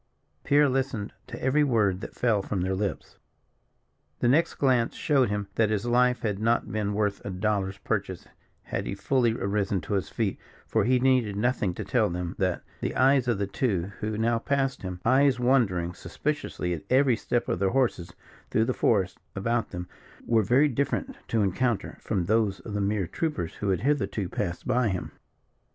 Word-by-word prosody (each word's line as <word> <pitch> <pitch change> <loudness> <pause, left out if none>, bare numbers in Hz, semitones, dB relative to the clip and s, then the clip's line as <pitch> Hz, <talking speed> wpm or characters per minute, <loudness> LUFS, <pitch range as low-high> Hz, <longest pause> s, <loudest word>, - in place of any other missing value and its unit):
Pierre 145 +1 +4
listened 130 -5 -2
to - - -7
every 145 +3 +2
word 105 -8 +2
that - - -8
fell 115 -4 +2
from 95 -1 -3
their 95 +1 0
lips. 100 +1 -4 1.0
The - - +1
next 150 +7 +3
glance 125 -4 +2
showed 135 -6 +2
him 105 -1 -2
that 110 0 +2
his 110 0 -1
life 125 +1 +3
had 105 -3 -1
not 115 +2 +1
been 105 -2 -1
worth 105 -1 -1
a - - -5
dollar's 95 0 -1
purchase - - -3 0.4
had - - -4
he - - -3
fully 125 -4 +1
arisen 100 -2 -1
to 105 - -4
his 95 -3 -1
feet, 110 -5 -2 0.3
for - - +1
he 130 +2 +4
needed 125 -5 +2
nothing 105 -4 0
to - - -5
tell - - +2
him 90 0 -3
that 95 -3 0 0.2
the - - -3
eyes 130 -1 +4
of 120 -4 +2
the 100 - 0
two 100 -3 -1
who 105 0 -2
now 115 +1 +1
passed 135 +2 -1
him 90 -2 -5
eyes 130 +1 +4
wandering 105 -10 +2
suspiciously 90 - -3
at 80 - -4
every 130 -1 +4
step 120 +2 -1
of - - -1
their 95 0 +2
horses 115 -8 0 0.4
through 110 - +2
the 130 - 0
forest 95 -8 +1 0.2
about 115 +3 0
them 90 -1 -6 0.4
were 115 -2 +3
very 125 +9 +4
different 145 - -1
to 110 -2 +1
encounter 115 +4 -1
from 100 -5 -1
those 105 0 +1
of 105 - -8
the 105 - -1
mere 100 -1 0
troopers 115 - -3
who 105 - -2
had 95 -3 +1
hitherto 130 -8 0
passed 90 -1 -4
by 125 -1 +2
him. 95 -4 -3
110 Hz, 185 wpm, -27 LUFS, 95-125 Hz, 1.0 s, Pierre